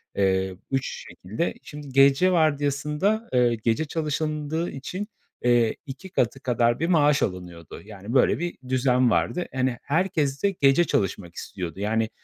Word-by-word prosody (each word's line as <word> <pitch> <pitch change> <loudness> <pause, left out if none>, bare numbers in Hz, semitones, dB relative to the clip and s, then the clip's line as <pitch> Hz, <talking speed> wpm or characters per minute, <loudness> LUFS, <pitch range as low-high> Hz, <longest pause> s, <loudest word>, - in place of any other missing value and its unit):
Eee, 95 -1 +1 0.2
3 135 -1 -2
şekilde. 110 - -3
Şimdi 145 -2 -9
gece 140 +7 +5
vardiyasında, 150 +6 +1
eee, 120 -2 +3
gece 115 +7 +1
çalışıldığı 155 +1 -2
için, 180 +10 -5 0.4
eee, 120 -2 +3
2 145 +8 -9
katı 130 -6 0
kadar 120 -1 +1
bir 165 - 0
maaş 150 -4 +3
alınıyordu. 90 -4 -6
Yani, 105 +2 -8
böyle 130 - +3
bir 175 0 -4
düzen 130 -1 +3
vardı. 180 +8 0
Hani, 130 -2 0
herkes 150 -3 0
de 200 - +3
gece 140 -1 +4
çalışmak 95 - -2
istiyordu. 90 -1 -6
Yani 110 +2 0
135 Hz, 140 wpm, -25 LUFS, 115-155 Hz, 0.4 s, gece